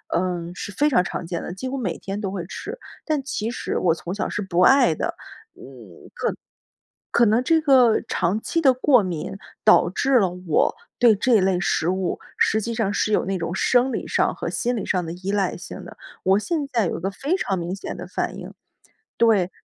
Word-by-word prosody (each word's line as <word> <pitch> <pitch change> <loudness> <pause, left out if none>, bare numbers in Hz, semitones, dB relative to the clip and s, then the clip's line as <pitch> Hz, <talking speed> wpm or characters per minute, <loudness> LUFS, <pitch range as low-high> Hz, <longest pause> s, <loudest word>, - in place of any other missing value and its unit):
嗯， 175 -1 -1
是 205 - -6
非 290 +9 +2
常 205 -11 +3
常 180 - -5
见 170 0 -4
的， - - -6
几 225 +8 -5
乎 275 - -3
每 190 -10 -3
天 195 +1 -5
都 200 -3 -3
会 190 -3 -4
吃。 455 - -7 0.3
但 305 -3 -1
其 230 -4 -3
实 - - -3
我 170 -3 +2
从 170 +2 -6
小 205 - -2
是 205 - -3
不 180 -3 0
爱 250 - +5
的， - - -2 0.4
嗯， - - -17 1.5
可 - - +2
可 - - +7
能 225 +4 +3
这 325 +4 +3
个 260 -7 +5
长 185 +4 0
期 330 - -1
的 270 -4 +5
过 255 -1 +4
敏， 185 +1 -4 0.3
导 215 -5 +5
致 260 +8 +2
了 190 -4 +2
我 180 -3 0 0.2
对 235 -3 +6
这 225 +2 +3
类 185 -1 +2
食 170 - 0
物， 185 -1 -1 0.2
实 220 - +2
际 230 +2 -3
上 220 -3 0
是 215 - 0
有 - - +2
那 190 0 -1
种 165 +1 -3
生 250 +5 +2
理 - - -3
上 - - +1
和 - - -4
心 245 0 -1
理 215 - -3
上 180 -1 0
的 165 - -5
依 185 +3 -4
赖 200 -3 0
性 180 - -9
的。 - - -12 0.3
我 190 +2 +4
现 300 +5 -2
在 230 -5 +1
有 - - -3
个 190 +3 -2
非 280 - -1
常 195 - -1
明 175 +2 -3
显 200 - -6
的 - - -7
反 - - -3
应 - - -9 0.6
对， 210 -6 +3
200 Hz, 230 characters per minute, -23 LUFS, 180-250 Hz, 1.5 s, 可